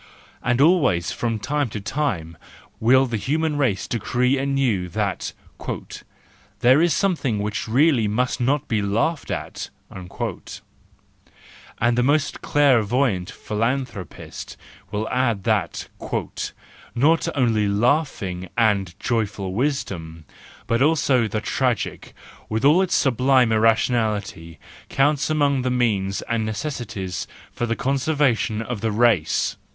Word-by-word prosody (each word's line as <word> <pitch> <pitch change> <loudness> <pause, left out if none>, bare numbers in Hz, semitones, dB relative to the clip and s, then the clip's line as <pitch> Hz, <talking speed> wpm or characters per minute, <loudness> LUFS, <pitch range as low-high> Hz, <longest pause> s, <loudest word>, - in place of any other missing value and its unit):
And 125 0 +1
always 140 - +3
from 115 -2 -2
time 140 +4 -1
to 105 - -5
time 95 - -2 0.4
will 130 +4 +5
the 120 -3 -2
human 155 +6 0
race 125 -10 0
decree 125 +3 +1
anew 135 -10 0
that 100 0 -2 1.3
"there 130 +5 +6
is 170 0 +3
something 160 - 0
which 105 +3 -3
really 130 -1 +3
may 110 +5 +1
not 140 +4 0
be 110 -4 0
laughed 115 +11 -1
at" - - -5 0.2
And 90 -1 -9 1.9
the 125 - +2
most 145 +3 +1
clairvoyant 125 -7 +2
philanthropist 115 -2 -4 0.3
will 105 +2 -3
add 120 -6 0
that - - -1 0.5
" 120 - -5
not 165 +2 +3
only 115 -6 +2
laughing 100 - 0
and 100 -6 +1
joyful 100 -5 -2
wisdom, 95 - -3 0.4
but 115 +2 0
also 140 -5 +3
the 110 0 -3
tragic, 125 -2 -2 0.3
with 110 +4 -1
all 155 +6 +6
its 185 -2 +1
sublime 130 -1 +3
irrationality, 110 -6 +1 0.3
counts 145 +2 +2
among 145 -3 +2
the 130 - -1
means 105 -6 0
and 115 -1 -1
necessities 110 -5 -4 0.2
for 120 - -3
the 115 - 0
conserva¬ 140 0 +1
tion 110 0 -2
of 115 -2 -5
the 110 -1 0
race! 105 -8 +2
120 Hz, 120 wpm, -22 LUFS, 105-140 Hz, 1.9 s, there